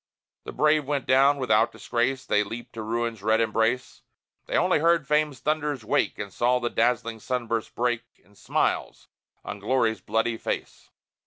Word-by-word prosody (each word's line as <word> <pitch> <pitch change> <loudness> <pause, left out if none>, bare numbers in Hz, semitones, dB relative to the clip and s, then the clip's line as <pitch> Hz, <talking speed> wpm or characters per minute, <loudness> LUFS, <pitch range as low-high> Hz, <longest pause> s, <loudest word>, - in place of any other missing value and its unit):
The - - -6
brave 150 -1 +2
went 140 -1 -2
down! 135 +2 +4
Without 115 -3 +2
disgrace 125 +4 -1
They 105 - +2
leaped 115 +3 -8
to 115 - -6
Ruin's 115 0 -2
red 110 +2 +2
embrace; 115 +3 0 0.5
They - - 0
only - - +3
heard 165 -1 +3
Fame's 150 -3 +1
thunders 150 -5 -1
wake, - - +1
And 100 -2 -6
saw 125 +1 +2
the 120 -1 -2
dazzling 115 -1 0
sunburst 115 -1 -3
break 120 -1 0 0.2
In 100 - -27
smiles - - -2 0.4
on - - -6
Glory's 110 -1 +1
bloody 115 +3 0
face! - - -5
120 Hz, 160 wpm, -26 LUFS, 110-135 Hz, 0.5 s, down